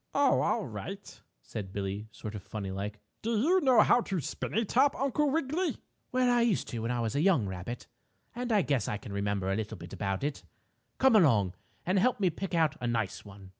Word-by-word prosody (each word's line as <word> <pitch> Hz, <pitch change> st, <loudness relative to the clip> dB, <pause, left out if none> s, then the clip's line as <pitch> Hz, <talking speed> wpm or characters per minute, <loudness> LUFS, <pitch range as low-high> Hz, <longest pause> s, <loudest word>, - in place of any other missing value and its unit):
"Oh, -, -, +4 dB
all -, -, +1 dB
right," -, -, -8 dB, 0.2 s
said 95 Hz, -, -6 dB
Billie, 100 Hz, +2 st, -4 dB
sort 105 Hz, 0 st, -7 dB
of 105 Hz, -, -6 dB
funny 100 Hz, 0 st, -5 dB
like. 100 Hz, +2 st, -4 dB, 0.2 s
"Do 230 Hz, 0 st, 0 dB
you 355 Hz, -, +3 dB
know 260 Hz, -5 st, +6 dB
how 245 Hz, -, +5 dB
to 195 Hz, -5 st, -2 dB
spin 140 Hz, -, -4 dB
a 225 Hz, +1 st, +2 dB
top, 265 Hz, +7 st, +3 dB
Uncle 280 Hz, +2 st, +1 dB
Wiggily?" 320 Hz, +4 st, 0 dB, 0.3 s
"Well, 255 Hz, 0 st, +2 dB
I 240 Hz, -1 st, +4 dB
used 235 Hz, -5 st, +1 dB
to 120 Hz, -, -4 dB
when 115 Hz, +1 st, -2 dB
I 125 Hz, 0 st, 0 dB
was 115 Hz, +1 st, -2 dB
a 145 Hz, -, +2 dB
young 170 Hz, -, +4 dB
rabbit, 95 Hz, +6 st, -5 dB, 0.5 s
and 245 Hz, 0 st, -3 dB
I 205 Hz, -4 st, +4 dB
guess 135 Hz, -7 st, 0 dB
I 105 Hz, -, -1 dB
can 100 Hz, 0 st, -9 dB
remember 100 Hz, -1 st, -1 dB
a -, -, +1 dB
little 110 Hz, 0 st, -4 dB
about 95 Hz, +1 st, -2 dB
it. 145 Hz, 0 st, -2 dB, 0.6 s
Come 265 Hz, -3 st, +5 dB
along 115 Hz, -, +4 dB, 0.3 s
and 185 Hz, +2 st, +2 dB
help 250 Hz, +4 st, +2 dB
me 185 Hz, -3 st, +2 dB
pick 190 Hz, +2 st, -4 dB
out 160 Hz, -3 st, +3 dB
a 120 Hz, -, -1 dB
nice 115 Hz, -4 st, -1 dB
one." 100 Hz, -2 st, -12 dB
135 Hz, 215 wpm, -30 LUFS, -, 0.6 s, know